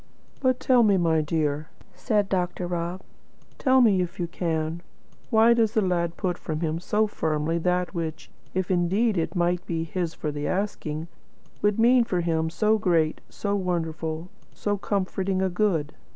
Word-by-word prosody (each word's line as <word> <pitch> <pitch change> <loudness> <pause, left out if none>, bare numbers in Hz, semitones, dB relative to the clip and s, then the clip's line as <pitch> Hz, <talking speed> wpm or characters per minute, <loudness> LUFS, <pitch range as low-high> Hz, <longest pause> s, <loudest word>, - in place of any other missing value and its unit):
"But 255 -2 +2
tell 255 -2 +4
me, 205 -4 +4
my 165 -3 +2
dear," 150 -1 -1 0.2
said 210 -3 0
Dr. 180 -1 -1
Rob, 175 +1 -3 0.6
"tell 260 -1 +4
me, 205 -6 +4
if 180 +3 -4
you 175 - 0
can: 165 -1 -2 0.5
why 225 +1 +6
does 225 -1 +1
the 220 - +4
lad 170 -2 0
put 180 -3 -2
from 155 0 -4
him 160 0 -1
so 210 +4 +1
firmly 160 -4 -1
that 180 +2 0
which, 165 -3 -5 0.2
if 185 0 -1
indeed 190 +5 +2
it 165 0 -1
might 175 0 +1
be 165 -1 -1
his 165 0 -3
for 150 - -3
the 145 0 -3
asking, 165 -5 -2 0.5
would 210 -1 +2
mean 240 +2 +5
for 180 -6 -1
him 160 -1 0
so 215 +5 +2
great, 165 -5 +1
so 200 -1 -2
wonderful, 165 -3 -2 0.3
so 205 -1 -1
comforting 190 -1 -1
a 190 0 +1
good?" 175 -6 0
180 Hz, 165 wpm, -25 LUFS, 165-205 Hz, 0.6 s, why